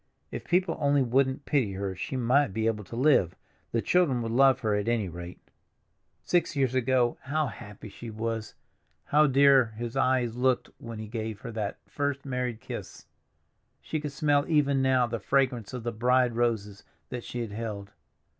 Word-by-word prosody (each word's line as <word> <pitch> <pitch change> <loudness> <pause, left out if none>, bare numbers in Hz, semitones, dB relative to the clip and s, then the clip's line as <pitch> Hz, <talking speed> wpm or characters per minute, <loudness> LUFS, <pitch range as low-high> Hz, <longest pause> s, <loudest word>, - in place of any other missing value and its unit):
If - - -6
people 180 -1 +1
only 140 -1 +3
wouldn't 130 +3 +1
pity 125 -10 +1
her 95 0 -3
she 115 - -5
might 125 -1 +2
be 110 0 0
able 110 -2 0
to 115 - -9
live; 125 - +3 0.4
the 115 - 0
children 145 -10 +2
would 115 - -3
love 135 +1 +4
her 110 -2 +1
at 105 +1 -1
any 115 -4 +1
rate. 85 +1 -8 0.8
Six 175 -2 +1
years 135 -3 +1
ago 130 -1 +1
how 155 +3 0
happy 105 -2 -9
she 115 +3 -9
was, 110 0 -4 0.5
how 150 +1 +4
dear 135 -4 +5
his 120 +1 -5
eyes 130 -3 +1
looked 125 0 +1
when 115 -1 -8
he 110 0 -6
gave 110 -2 -5
her - - -6
that 105 -2 -3
first 145 -1 -2
married 125 -4 -2
kiss! - - -8 0.7
She 155 - -3
could 150 -1 -5
smell 145 0 +2
even 140 -4 +3
now 130 -2 +3
the 115 -1 -4
fragrance 125 -1 0
of 125 -3 -6
the 120 - -2
bride 125 +1 +2
roses 110 -4 -1 0.3
that 120 -2 -5
she 120 - -5
had 115 -3 -5
held. 105 -2 -5
120 Hz, 180 wpm, -28 LUFS, 110-135 Hz, 0.8 s, dear